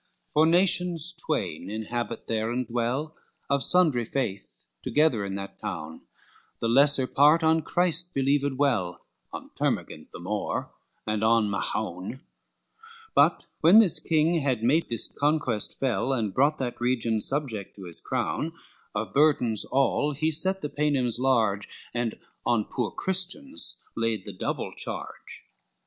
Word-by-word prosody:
LXXXIV -, -, -35 dB
For 155 Hz, +1 st, +5 dB
nations 175 Hz, -1 st, +4 dB
twain 155 Hz, -, -3 dB
inhabit 110 Hz, +2 st, -4 dB
there 110 Hz, 0 st, -1 dB
and 125 Hz, +1 st, -2 dB
dwell 125 Hz, +7 st, -2 dB, 0.4 s
Of 140 Hz, -1 st, +2 dB
sundry 160 Hz, -10 st, +3 dB
faith 105 Hz, -, -4 dB, 0.2 s
together 145 Hz, -8 st, +2 dB
in 100 Hz, -1 st, -4 dB
that 100 Hz, 0 st, -7 dB
town, 85 Hz, -7 st, -7 dB, 0.5 s
The 115 Hz, -, -1 dB
lesser 140 Hz, +3 st, +5 dB
part 150 Hz, +5 st, +4 dB
on 160 Hz, 0 st, +3 dB
Christ 175 Hz, +2 st, +2 dB
believed 140 Hz, 0 st, +1 dB
well, 115 Hz, -11 st, 0 dB, 0.3 s
On -, -, -9 dB
Termagent -, -, -3 dB
the -, -, -9 dB
more -, -, -3 dB, 0.3 s
and 110 Hz, 0 st, -2 dB
on 110 Hz, -2 st, +3 dB
Mahown, 100 Hz, +4 st, -4 dB, 0.9 s
But -, -, +3 dB
when 170 Hz, +7 st, +6 dB
this 215 Hz, -7 st, +6 dB
king 165 Hz, +1 st, +1 dB
had 130 Hz, -6 st, -1 dB
made 150 Hz, +8 st, +2 dB
this 115 Hz, -2 st, +1 dB
conquest 145 Hz, -7 st, -1 dB
fell, 135 Hz, 0 st, 0 dB
And 110 Hz, -6 st, -2 dB
brought 145 Hz, +6 st, +2 dB
that 125 Hz, -3 st, -5 dB
region 115 Hz, -3 st, +1 dB
subject 130 Hz, -8 st, +1 dB
to 100 Hz, -, -11 dB
his 85 Hz, -2 st, -3 dB
crown, 160 Hz, +2 st, -2 dB, 0.4 s
Of 110 Hz, +1 st, -3 dB
burdens 135 Hz, -7 st, +3 dB
all 140 Hz, +2 st, +1 dB
he 155 Hz, +3 st, 0 dB
set 190 Hz, +5 st, 0 dB
the 150 Hz, -, -2 dB
Paynims 135 Hz, -6 st, 0 dB
large, 115 Hz, -6 st, +1 dB, 0.2 s
And 120 Hz, -2 st, -2 dB, 0.3 s
on 115 Hz, -3 st, +1 dB
poor 120 Hz, -4 st, -3 dB
Christians 190 Hz, -, 0 dB
laid 115 Hz, -3 st, -1 dB
the -, -, -7 dB
double -, -, -4 dB
charge. -, -, -4 dB
130 Hz, 145 wpm, -26 LUFS, 110-155 Hz, 0.9 s, when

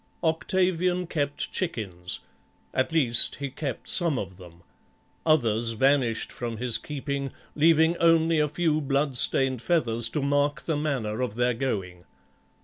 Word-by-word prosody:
Octavian 180 Hz, +2 st, 0 dB
kept 145 Hz, -4 st, -2 dB
chickens; 95 Hz, -, -4 dB, 0.5 s
at 130 Hz, +5 st, 0 dB
least 130 Hz, -8 st, +4 dB
he 140 Hz, -1 st, -6 dB
kept 135 Hz, -3 st, -6 dB
some 170 Hz, -6 st, +4 dB
of 95 Hz, -4 st, -6 dB
them; 85 Hz, -2 st, -15 dB, 0.6 s
others 115 Hz, -7 st, +2 dB
vanished 130 Hz, -1 st, +1 dB
from 115 Hz, -2 st, -5 dB
his 115 Hz, -1 st, +1 dB
keeping, 140 Hz, 0 st, -5 dB, 0.2 s
leaving 160 Hz, +2 st, +4 dB
only 165 Hz, -1 st, +3 dB
a 150 Hz, 0 st, +1 dB
few 155 Hz, 0 st, 0 dB
bloodstained 135 Hz, -2 st, +2 dB
feathers 120 Hz, -9 st, +1 dB
to 140 Hz, +5 st, -3 dB
mark 145 Hz, 0 st, 0 dB
the 160 Hz, -, -2 dB
manner 130 Hz, -7 st, -2 dB
of 125 Hz, -5 st, -3 dB
their 120 Hz, +1 st, +1 dB
going. 95 Hz, -8 st, -4 dB
140 Hz, 135 wpm, -26 LUFS, 115-160 Hz, 0.6 s, least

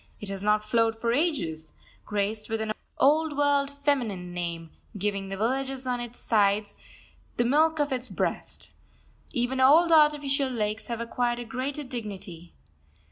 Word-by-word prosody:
It 210 Hz, -, -7 dB
has 195 Hz, -1 st, -4 dB
not 210 Hz, +1 st, +2 dB
flowed 225 Hz, 0 st, +2 dB
for 230 Hz, +1 st, -1 dB
ages, 200 Hz, -, -1 dB, 0.3 s
graced 210 Hz, +1 st, -2 dB
with 225 Hz, 0 st, -1 dB
an 220 Hz, 0 st, -1 dB, 0.2 s
old 300 Hz, +1 st, +3 dB
world 285 Hz, -1 st, +3 dB
feminine 250 Hz, -11 st, -1 dB
name, 170 Hz, -2 st, -4 dB, 0.3 s
giving 200 Hz, -1 st, -2 dB
the 195 Hz, -, -4 dB
villages 265 Hz, +4 st, -1 dB
on 250 Hz, -1 st, -1 dB
its 240 Hz, 0 st, -6 dB
sides 205 Hz, -1 st, +1 dB, 0.6 s
the 240 Hz, -, +2 dB
milk 315 Hz, +5 st, +3 dB
of 290 Hz, -2 st, 0 dB
its 250 Hz, 0 st, -3 dB
breast. -, -, -3 dB, 0.6 s
Even 255 Hz, -1 st, -1 dB
old 320 Hz, +6 st, +6 dB
artificial 290 Hz, -3 st, +4 dB
lakes 215 Hz, -2 st, -2 dB
have 235 Hz, -1 st, -3 dB
acquired 240 Hz, +1 st, -1 dB
a 240 Hz, -, -5 dB
greater 265 Hz, +5 st, -3 dB
dignity. 195 Hz, -, -7 dB
240 Hz, 150 wpm, -27 LUFS, 210-275 Hz, 0.6 s, old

